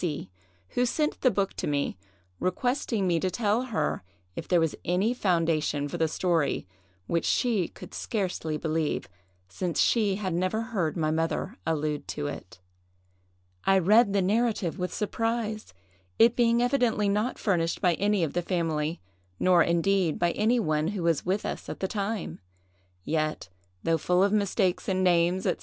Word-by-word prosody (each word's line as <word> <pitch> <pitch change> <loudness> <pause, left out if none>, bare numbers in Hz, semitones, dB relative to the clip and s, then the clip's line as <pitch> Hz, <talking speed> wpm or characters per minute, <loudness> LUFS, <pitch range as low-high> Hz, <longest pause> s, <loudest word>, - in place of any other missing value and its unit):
C——, 145 - -3 0.4
who 245 - 0
sent 300 +5 -1
the 255 - +5
book 200 -4 -1
to - - -2
me, 140 -7 -1 0.4
requesting 230 +1 0
me 170 -2 +2
to 185 - 0
tell 215 +5 0
her 160 -12 -1 0.3
if - - -6
there 175 - +3
was 165 -2 +1
any 190 +7 +1
foundation 165 - 0
for 170 +4 -5
the 160 - +3
story, 165 - 0 0.4
which 170 - 0
she 220 -9 +1
could - - -12
scarcely 180 -7 -2
believe, 155 0 -1 0.4
since 170 - -3
she 210 -5 +3
had 190 -3 -3
never 185 +5 0
heard 195 -9 -2
my 155 -2 +1
mother 165 +6 -1
allude 150 -2 -1
to 145 - -4
it. 145 -11 -7 1.0
I 195 - +4
read 200 +4 +5
the 200 -2 +2
narrative 210 -3 0
with 180 0 -2
surprise, 220 - -2 0.5
it 230 +1 +5
being 235 0 +3
evidently 245 -5 +2
not 210 +5 0
furnished 170 -5 0
by 180 -2 +3
any 205 +1 +1
of 155 - -2
the 175 - 0
family, 165 -3 -1 0.4
nor 180 -2 +5
indeed 170 0 +2
by 175 0 +2
any 230 +6 +2
one 155 -5 0
who 195 -2 -3
was 165 0 +1
with 195 +3 0
us - - -5
at - - -6
the 190 - -1
time! 205 0 -3 0.6
yet, 155 - -2 0.3
though 165 -1 +1
full 180 +4 +2
of 200 - +2
mistakes 200 -3 +1
in 185 0 +1
names, 175 +1 +3
&c. - - 0
185 Hz, 165 wpm, -27 LUFS, 165-210 Hz, 1.0 s, the